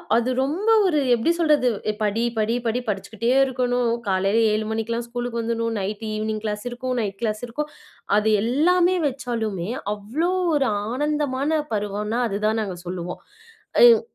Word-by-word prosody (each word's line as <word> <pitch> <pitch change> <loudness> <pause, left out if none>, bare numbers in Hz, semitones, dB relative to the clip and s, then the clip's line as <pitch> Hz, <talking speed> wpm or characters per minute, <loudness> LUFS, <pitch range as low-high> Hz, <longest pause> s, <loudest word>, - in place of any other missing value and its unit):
அது 235 +2 +2
ரொம்ப 330 +11 0 0.2
ஒரு 325 -5 +2
எப்படி 240 +8 +2
சொல்றது? 300 -6 +3 0.2
"ஏய், 215 - -1
படி, 215 +2 +1
படி, 220 +2 +1
படி!" 230 +2 +1
படிச்சுக்கிட்டே 210 +3 -2 0.2
இருக்கணும். 250 -2 0 0.2
காலையில 195 +3 +2
7 215 0 0
மணிக்கெல்லாம் 230 +1 -2
ஸ்கூலுக்கு 240 0 -3
வந்துரணும். 230 0 -1
நைட்டு 205 +3 -4
ஈவினிங் 215 0 -2
கிளாஸ் 210 0 -3
இருக்கும். 255 +1 -3
நைட் 195 -2 -4
கிளாஸ் 215 -2 -1
இருக்கும். 300 +6 -4 0.5
அது 215 +1 +2
எல்லாமே 345 +9 +3
வச்சாலுமே, 225 -8 -3 0.3
அவ்ளோ 260 - -2 0.2
ஒரு 275 -2 +2 0.2
ஆனந்தமான 295 +2 0
பருவம்னா, 210 +2 -2
அது 200 0 -2
தான் 220 +1 +1
நாங்க 190 -4 -5
சொல்லுவோம். 180 0 -5 0.6
அம். 470 -2 +8
230 Hz, 150 wpm, -23 LUFS, 215-265 Hz, 0.6 s, அம்